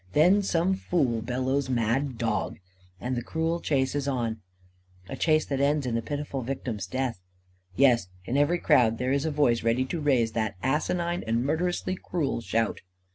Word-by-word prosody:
Then 180 +7 +5
some 185 -1 +1
fool 140 -11 0
bellows: 130 +3 -1
"Mad 125 +2 0
dog!" 110 -4 -1 0.4
And 125 +4 -2
the 120 - -2
cruel 165 +5 -1
chase 135 -5 0
is 145 -1 -2
on 115 -5 -2 0.7
a - - -5
chase 155 -1 +2
that 135 -2 -2
ends 145 0 +2
in 125 - -2
the 115 - 0
pitiful 145 +3 -4
victim's 115 -6 -4
death. 130 -1 -2 0.6
Yes, 125 -7 +4 0.2
in 125 - -2
every 145 +5 +3
crowd 125 -9 +3
there 125 +2 -1
is 140 +2 +1
a 160 - 0
voice 140 -6 +2
ready 115 +3 +1
to 160 +5 -4
raise 125 -6 +2
that 110 -2 -1
asinine 170 +6 0
and 115 +2 +1
murderously 175 +5 -1
cruel 155 -9 -2
shout. 115 -1 -1
135 Hz, 175 wpm, -27 LUFS, 115-155 Hz, 0.7 s, Then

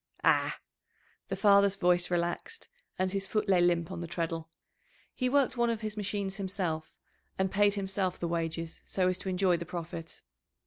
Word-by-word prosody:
"Ah!" - - +3 0.7
The - - -2
father's 200 -1 +5
voice 175 -2 +3
relaxed, 175 - -2 0.3
and 185 0 0
his 195 0 -1
foot 215 +1 0
lay 185 -2 +4
limp 175 0 +2
on 175 -2 -5
the 170 - -4
treadle. 165 -1 -3 0.6
He 255 -1 0
worked 275 -2 +2
one 240 0 +3
of 230 -1 -1
his 215 -1 -4
machines 200 -1 -2
himself, 185 -5 -3 0.4
and 190 -1 +1
paid 205 0 +3
himself 190 -2 -1
the 170 - -1
wages 165 -1 -3
so 185 -1 +1
as 185 0 -1
to 190 - -4
enjoy 185 -1 +2
the 170 - -5
profit. 165 -1 -6
185 Hz, 175 wpm, -30 LUFS, 170-200 Hz, 0.7 s, father's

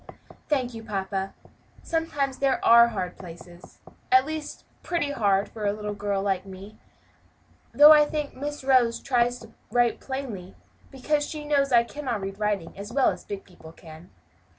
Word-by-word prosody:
"Thank 255 -5 0
you, 225 -1 -8
papa; 195 -2 -4 0.5
sometimes 290 -5 -2
there 275 -1 +1
are 235 0 +8
hard 185 -6 -5
places 175 0 -13 0.3
at 260 +1 +6
least 310 0 -6 0.2
pretty 335 -5 -2
hard 200 -6 +1
for 215 0 -9
a 200 - +1
little 210 0 -5
girl 200 -1 -2
like 190 -2 -1
me 195 +2 -12 0.9
though 295 +1 +8
I 300 -1 +7
think 300 -1 -4
Miss 290 +2 -5
Rose 255 -3 +3
tries 245 -2 +1
to 225 -1 -14 0.2
write 240 +1 +1
plainly 235 -9 -6 0.3
because 290 +2 -1
she 300 -1 -7
knows 280 -2 +2
that 245 - +5
I 235 - +5
cannot 250 -4 -4
read 195 +1 -6
writing 205 -5 -2
as 200 +3 -8
well 270 +1 +3
as - - -9
big 200 -1 -7
people 160 -3 -15
can." 160 +1 -14
235 Hz, 170 wpm, -25 LUFS, 195-275 Hz, 0.9 s, are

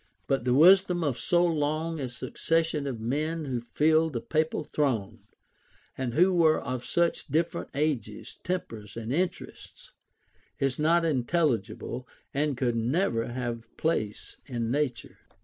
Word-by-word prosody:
But 135 -3 0
the 125 0 +3
wisdom 180 +2 +6
of 140 -6 -1
so 175 0 +3
long 160 0 -1
a 130 -3 -3
succession 160 +3 -1
of 125 -5 -4
men 150 +7 -2
who 125 -4 -2
filled 155 +5 +2
the 120 - -1
papal 155 +5 -1
throne, 115 -8 -1 0.8
and 125 -2 -3
who 185 +3 +5
were 160 -3 +4
of 130 -2 -4
such 170 -2 0
different 160 +4 -1
ages, 135 -8 -2
tempers, 115 - -4
and 115 +2 -3
interests, 175 +3 -4 0.7
is 135 -1 -1
not 165 +2 +3
intelligible, 130 - -1 0.3
and 145 -1 0
could 125 -2 0
never 115 - 0
have 120 -1 -4
place 110 -10 -2
in 120 -4 -2
nature. 140 -3 -2
145 Hz, 135 wpm, -28 LUFS, 120-160 Hz, 0.8 s, wisdom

